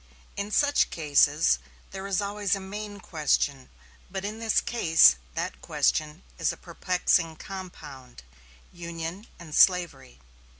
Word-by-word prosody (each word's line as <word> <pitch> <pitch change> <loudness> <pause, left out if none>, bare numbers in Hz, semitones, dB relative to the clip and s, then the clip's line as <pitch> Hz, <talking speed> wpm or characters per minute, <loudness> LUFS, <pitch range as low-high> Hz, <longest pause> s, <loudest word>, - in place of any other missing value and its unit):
In 200 +1 -4
such 285 +6 +2
cases 150 -1 +3 0.3
there 195 0 -6
always 205 0 -4
is - - +4
a - - -5
main 205 +1 -7
question; 145 -5 -1 0.4
but 190 0 -5
in 215 +2 -5
this 225 -1 +2
case 160 - +5 0.2
that - - -4
question 155 +2 0 0.2
is - - +1
a - - -9
perplexing 175 -1 0
compound 150 - -10 0.5
Union 170 +3 -7
and 165 -3 -11
slavery. 170 - +2
175 Hz, 125 wpm, -27 LUFS, 155-200 Hz, 0.5 s, case